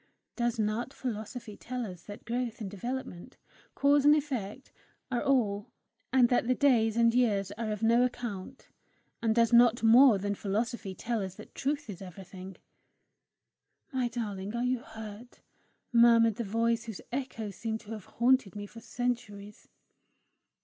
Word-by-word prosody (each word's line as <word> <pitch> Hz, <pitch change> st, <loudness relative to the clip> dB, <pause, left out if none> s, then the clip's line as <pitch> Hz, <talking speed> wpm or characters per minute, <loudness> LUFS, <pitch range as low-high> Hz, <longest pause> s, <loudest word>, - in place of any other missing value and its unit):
Does 240 Hz, -1 st, 0 dB
not 220 Hz, +4 st, -1 dB
philosophy 225 Hz, -2 st, -5 dB
tell 250 Hz, +2 st, -5 dB
us 180 Hz, -4 st, -9 dB
that 205 Hz, 0 st, -10 dB
growth 240 Hz, 0 st, -3 dB
and 200 Hz, -4 st, -5 dB
development, 240 Hz, 0 st, -6 dB, 0.4 s
cause 285 Hz, 0 st, +4 dB
and 295 Hz, +1 st, +7 dB
effect, 265 Hz, -5 st, -4 dB, 0.4 s
are 245 Hz, -, 0 dB
all, 215 Hz, -7 st, +1 dB, 0.4 s
and 255 Hz, -2 st, +5 dB
that 245 Hz, -1 st, +2 dB
the 255 Hz, -, +3 dB
days 235 Hz, -6 st, +3 dB
and 230 Hz, 0 st, +4 dB
years 205 Hz, -6 st, +2 dB
are 215 Hz, +1 st, -4 dB
of 210 Hz, +1 st, -4 dB
no 235 Hz, +2 st, +5 dB
account? 245 Hz, -2 st, -4 dB, 0.5 s
And 225 Hz, -1 st, +1 dB
does 230 Hz, 0 st, +3 dB
not 235 Hz, -1 st, +6 dB
more 235 Hz, 0 st, +7 dB
than 200 Hz, +1 st, -2 dB
philosophy 205 Hz, 0 st, -3 dB
tell 230 Hz, +1 st, -2 dB
us 190 Hz, -1 st, -5 dB
that 215 Hz, -, -13 dB
truth 290 Hz, +1 st, -2 dB
is 200 Hz, -4 st, -8 dB
everything? 190 Hz, 0 st, -10 dB, 1.4 s
"My 255 Hz, -2 st, +1 dB
darling! 210 Hz, -3 st, -4 dB
Are 240 Hz, -, -1 dB
you 250 Hz, 0 st, +1 dB
hurt?" 220 Hz, -1 st, -10 dB, 0.5 s
murmured 230 Hz, -2 st, +6 dB
the 235 Hz, -, -2 dB
voice 230 Hz, +2 st, 0 dB
whose 220 Hz, -4 st, -7 dB
echoes 235 Hz, -6 st, -4 dB
seemed 220 Hz, +1 st, -3 dB
to 220 Hz, -1 st, -12 dB
have 215 Hz, -4 st, -7 dB
haunted 245 Hz, -4 st, +2 dB
me 205 Hz, 0 st, -5 dB
for 230 Hz, +3 st, -12 dB
centuries. 215 Hz, -4 st, -4 dB
230 Hz, 155 wpm, -30 LUFS, 205-245 Hz, 1.4 s, and